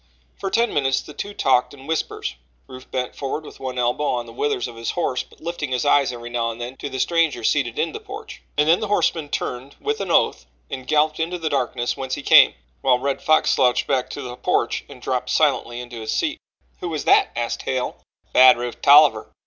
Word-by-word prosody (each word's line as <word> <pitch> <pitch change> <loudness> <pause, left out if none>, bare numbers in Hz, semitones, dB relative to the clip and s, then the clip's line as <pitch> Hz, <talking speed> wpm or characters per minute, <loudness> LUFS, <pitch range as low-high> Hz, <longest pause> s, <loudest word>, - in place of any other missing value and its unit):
For 195 - -4
ten 230 +4 +1
minutes 135 -2 +1
the 150 - -12
two 205 +7 -6
talked 130 +1 +2
in 135 -1 -14
whispers 160 +1 -3 0.3
Rufe 130 0 -12
bent 125 -1 -3
forward 150 +2 -4
with - - -12
one 130 -1 -5
elbow 125 +4 0
on 120 -1 -2
the 115 - -12
withers 125 0 -1
of 120 - -10
his 115 0 -4
horse 150 -8 -1
but - - -17
lifting 165 -4 -4
his 125 +2 0
eyes 145 -2 +4
every 120 -1 -8
now 115 -1 0
and 115 0 -7
then 120 +2 -6
to 145 - -5
the 130 - -5
stranger 165 -6 +1
seated 120 -2 +1
in - - 0
the - - -7
porch - - -10 0.2
and 150 +1 +3
then 170 +3 +5
the 215 - -3
horseman 165 -7 0
turned 130 0 -4
with 220 -1 -2
an 195 - -4
oath - - +2 0.2
and 130 - -6
galloped 155 +1 +2
into 170 +2 -1
the 160 -2 -3
darkness 125 -3 -1
whence 130 -1 -3
he - - -7
came, - - +7 0.3
while 125 -1 +4
the 125 - -12
Red 140 -1 -1
Fox 155 0 +3
slouched 125 -2 +2
back 130 -2 0
to 145 - -6
the 125 -1 -6
porch 125 - 0
and - - -13
dropped - - -2
silently 120 0 +1
into 120 -2 -8
his 110 - -3
seat. 315 -1 -1 0.4
"Who 175 - -4
was 155 -3 -4
that?" - - +5
asked 120 0 -2
Hale. 130 -1 -2 0.4
"Bad 130 -1 +8
Rufe 120 0 -5
Tolliver." 140 -6 +6
135 Hz, 230 wpm, -22 LUFS, 125-155 Hz, 0.4 s, Bad